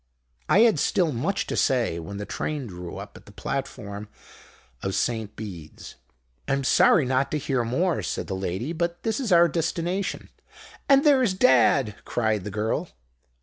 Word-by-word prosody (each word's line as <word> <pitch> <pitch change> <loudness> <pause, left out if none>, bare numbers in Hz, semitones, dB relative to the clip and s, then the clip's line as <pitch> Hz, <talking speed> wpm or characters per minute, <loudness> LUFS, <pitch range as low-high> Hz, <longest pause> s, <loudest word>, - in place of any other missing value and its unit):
"I 200 - +6
had 230 -2 +4
still 175 -5 +1
much 165 +11 -1
to - - -4
say 120 -10 +1
when 90 +5 -7
the 105 - -5
train 150 +3 -3
drew 90 -4 -8
up - - -9
at - - -18
the - - -12
platform 105 -6 -5 0.7
of 95 - -2
St 110 -3 -1
Beeds. 90 -8 -9 0.5
"'I'm 135 0 0
sorry 135 +2 +4
not 130 +1 +1
to 155 - -1
hear 135 -4 -1
more,' 160 +9 0
said - - -3
the 95 - -4
lady, 95 - -3
'but 170 +1 -3
this 220 +1 -1
is 245 -7 -2
our 170 0 +7
destination.' 175 +4 -2 0.6
"'And 275 0 +6
there's 260 -9 +4
Dad!' 130 - +4
cried 110 -5 -1
the - - -3
girl. 110 +2 -2
130 Hz, 165 wpm, -25 LUFS, 105-170 Hz, 0.7 s, our